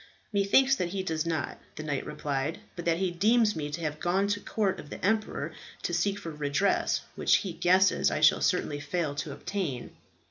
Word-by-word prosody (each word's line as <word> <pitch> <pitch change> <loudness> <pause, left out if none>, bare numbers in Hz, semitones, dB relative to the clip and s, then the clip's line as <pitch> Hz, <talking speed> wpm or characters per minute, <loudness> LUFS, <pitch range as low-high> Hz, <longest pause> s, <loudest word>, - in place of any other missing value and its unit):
"Methinks 235 +7 +4
that 180 - 0
he 190 +1 -3
does 160 -3 -2
not," 160 -3 -2 0.2
the 155 - -6
knight 145 -3 -2
replied, 145 +2 -2 0.2
"but 175 - -6
that 165 -1 +2
he 185 0 0
deems 215 +4 +3
me 150 -2 -3
to 155 +3 -5
have 150 -1 -3
gone 180 +4 +1
to 205 0 0
the - - -19
court 205 -4 0
of 145 - -10
the - - -5
emperor 215 +1 0 0.3
to - - -2
seek 200 -1 +1
for 165 - -6
redress 150 +6 +1
which, - - +3
he 185 - -3
guesses, 185 +3 +4
I - - -1
shall - - +5
certainly 145 -1 +1
fail 145 +1 -2
to 145 +1 -4
obtain." 145 -3 -4
175 Hz, 205 wpm, -29 LUFS, 150-200 Hz, 0.3 s, shall